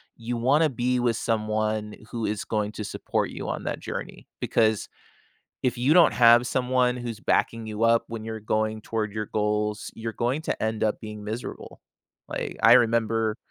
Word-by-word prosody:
You 120 Hz, +1 st, -4 dB
wanna 145 Hz, +7 st, +3 dB
be 125 Hz, -1 st, 0 dB
with 120 Hz, -2 st, +1 dB
someone 110 Hz, -1 st, -1 dB, 0.2 s
who 115 Hz, -2 st, -3 dB
is 105 Hz, 0 st, -2 dB
going 105 Hz, -1 st, -1 dB
to 105 Hz, -, -5 dB
support -, -, -2 dB
you -, -, -6 dB
on -, -, -3 dB
that -, -, -3 dB
journey -, -, -7 dB
because 110 Hz, -2 st, +1 dB, 0.8 s
if 125 Hz, -, 0 dB
you 125 Hz, +5 st, +2 dB
don't 175 Hz, 0 st, +6 dB
have 120 Hz, 0 st, +6 dB
someone 125 Hz, 0 st, +1 dB
who's 120 Hz, -3 st, -6 dB
backing 115 Hz, -1 st, 0 dB
you 110 Hz, 0 st, -4 dB
up 115 Hz, 0 st, +4 dB
when 115 Hz, -1 st, -6 dB
you're 110 Hz, 0 st, -5 dB
going 110 Hz, +1 st, -1 dB
toward 110 Hz, -1 st, -3 dB
your 110 Hz, 0 st, -3 dB
goals, 105 Hz, 0 st, -1 dB
you're 115 Hz, 0 st, -5 dB
going 125 Hz, +5 st, 0 dB
to -, -, -3 dB
end 110 Hz, 0 st, -1 dB
up 110 Hz, -1 st, +1 dB
being 105 Hz, -1 st, -8 dB
miserable, 110 Hz, +3 st, -7 dB, 0.5 s
like, -, -, -4 dB
I 115 Hz, -, +8 dB
remember 115 Hz, -2 st, +2 dB
115 Hz, 180 wpm, -26 LUFS, 110-120 Hz, 0.8 s, I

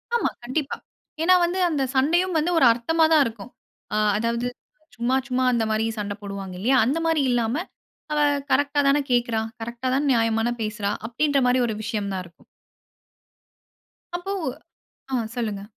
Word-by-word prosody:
ஆமா -, -, +2 dB
கண்டிப்பா. 275 Hz, +3 st, -2 dB, 0.5 s
ஏன்னா, 370 Hz, -, +6 dB
வந்து 365 Hz, +2 st, -2 dB
அந்த 295 Hz, -4 st, 0 dB
சண்டையும் 340 Hz, +6 st, +2 dB
வந்து 325 Hz, +3 st, +1 dB
ஒரு 270 Hz, -, +5 dB
அர்த்தமா 320 Hz, +8 st, +2 dB
தான் 300 Hz, -2 st, +6 dB
இருக்கும். 225 Hz, 0 st, -7 dB, 0.4 s
ஆ -, -, +1 dB, 0.2 s
அதாவது 235 Hz, +2 st, -1 dB, 0.5 s
சும்மா 245 Hz, +2 st, 0 dB
சும்மா 255 Hz, 0 st, 0 dB
அந்தமாரி 220 Hz, -1 st, +1 dB
சண்ட 205 Hz, 0 st, -3 dB
போடுவாங்க 195 Hz, -2 st, -6 dB
இல்லயா? 260 Hz, +6 st, +3 dB
அந்தமாரி 325 Hz, +2 st, +1 dB
இல்லாம, 235 Hz, +1 st, +1 dB, 0.6 s
அவ 300 Hz, -, +1 dB, 0.3 s
கரெக்ட்‌டாதானே 285 Hz, 0 st, +3 dB
கேக்குறா? 240 Hz, -2 st, +2 dB, 0.2 s
கரெக்ட்‌டா 235 Hz, +3 st, -4 dB
தான 290 Hz, +2 st, +1 dB
நியாயமான 225 Hz, 0 st, +1 dB
பேசுறா? 210 Hz, -2 st, -2 dB, 0.2 s
அப்டின்றமாரி 255 Hz, 0 st, +2 dB
ஒரு 220 Hz, -, -2 dB
விஷயம் 210 Hz, -3 st, -2 dB
தான் 185 Hz, -1 st, -3 dB
இருக்கும். 170 Hz, -1 st, -20 dB, 1.7 s
அப்போ 385 Hz, +3 st, -6 dB, 0.8 s
ஆ -, -, +1 dB, 0.2 s
சொல்லுங்க! 215 Hz, -5 st, -3 dB
245 Hz, 135 wpm, -24 LUFS, 220-290 Hz, 1.7 s, ஏன்னா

